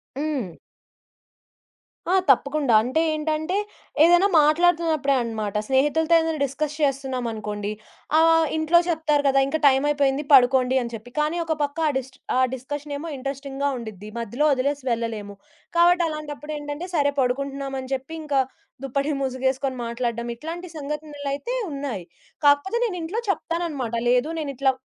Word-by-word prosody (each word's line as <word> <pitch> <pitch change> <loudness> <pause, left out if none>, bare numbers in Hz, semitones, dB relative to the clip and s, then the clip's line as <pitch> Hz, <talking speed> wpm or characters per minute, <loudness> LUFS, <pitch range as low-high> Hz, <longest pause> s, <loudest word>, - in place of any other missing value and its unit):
హ్మ్. 275 - -3 1.5
ఆ! - - +3 0.2
తప్పకుండా 280 -1 +3
అంటే 260 +8 0
ఏంటంటే 310 +3 -1 0.5
ఏదైనా 350 +4 +6
మాట్లాడుతున్నప్పుడే 315 -2 +3
అన్నమాట. 220 -3 -3
స్నేహితులతో 295 +5 +2
ఏదైనా 320 -2 -1
డిస్‌కస్ 285 +2 -2
చేస్తున్నామనుకోండి 235 -7 -2 0.5
ఆహ్, 325 0 +5
ఇంట్లో 315 +2 +4
చెప్తారు 305 -3 +1
గదా! 275 0 +4
ఇంకా 315 +3 -1
టైమయిపోయింది 280 +1 +2
పడుకోండి 255 0 +5
అని 235 -1 -5
చెప్పి 235 +3 -11
కానీ 305 +3 0
ఒక 320 - 0
పక్క 285 +2 -3
ఆ - - +3
డిస్ట్ 265 0 -7 0.2
ఆ - - +4
డిస్‌కషనేమో 290 +4 -5
ఇంట్రెస్టింగ్‌గా 275 +1 -3
ఉండిద్ది 215 -3 -8
మధ్యలో 235 +7 -1
ఒదిలేసి 275 +1 -1
వెళ్ళలేము. 220 -3 -3 0.4
కాబట్టి 350 +1 +5
అలాంటప్పుడేంటంటే 300 +1 -5
సరే 285 -1 +3
పడుకుంటున్నాం 275 +2 -1
అని 260 0 -7
జెప్పి 270 +5 -4
ఇంకా 285 -3 +1 0.4
దుప్పటి 275 +3 -1
మూసుగేసుకొని 265 0 -1
మాట్లాడడం 235 0 -3
ఇట్లాంటి 335 +7 -7
సంఘటనలయితే 295 - -4 0.2
ఉన్నాయి. 275 -9 -4 0.4
కాకపోతే 290 +11 +4
నేను 370 -5 -3
ఇంట్లో 380 +8 -2
చెప్తానన్నమాట 330 - -2 0.2
లేదు 250 +5 +3
నేనిట్లా 275 -2 +1
280 Hz, 125 wpm, -24 LUFS, 255-310 Hz, 1.5 s, ఏదైనా